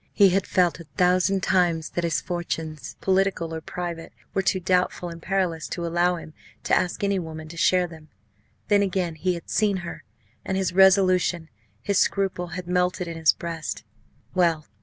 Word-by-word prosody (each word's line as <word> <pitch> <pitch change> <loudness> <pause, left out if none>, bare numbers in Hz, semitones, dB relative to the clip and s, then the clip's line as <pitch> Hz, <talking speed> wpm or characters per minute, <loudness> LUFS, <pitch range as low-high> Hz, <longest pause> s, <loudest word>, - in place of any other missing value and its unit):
He 200 -2 +6
had 195 +1 0
felt 180 -3 +2
a 170 - -10
thousand 185 +1 +3
times 170 -4 +2
that 175 - -2
his 165 -3 0
fortunes, 160 -4 -4
political 190 -3 +1
or 160 - -4
private, 170 -1 -6 0.2
were 195 - +1
too 190 0 +1
doubtful 180 0 0
and 170 0 -9
perilous 180 -4 -1
to 170 - -4
allow 175 +1 +2
him 160 -2 -9 0.3
to - - -1
ask 180 +2 +1
any 200 -1 +1
woman 160 -2 -7
to 170 - -9
share 180 +1 +3
them. 160 -3 -12 0.6
Then, 205 -2 +4
again, 185 -3 0
he 180 +3 -1
had 170 - -9
seen 205 -3 +1
her - - -7 0.4
and 190 - -2
his 190 -2 0
resolution, 185 -3 +4 0.3
his 200 -1 +1
scruple, 190 -3 0
had 180 - -5
melted 180 0 0
in 165 - -5
his 160 -1 +4
breast! 165 -3 -5 0.5
Well! 170 -4 +2
180 Hz, 180 wpm, -25 LUFS, 165-190 Hz, 0.6 s, He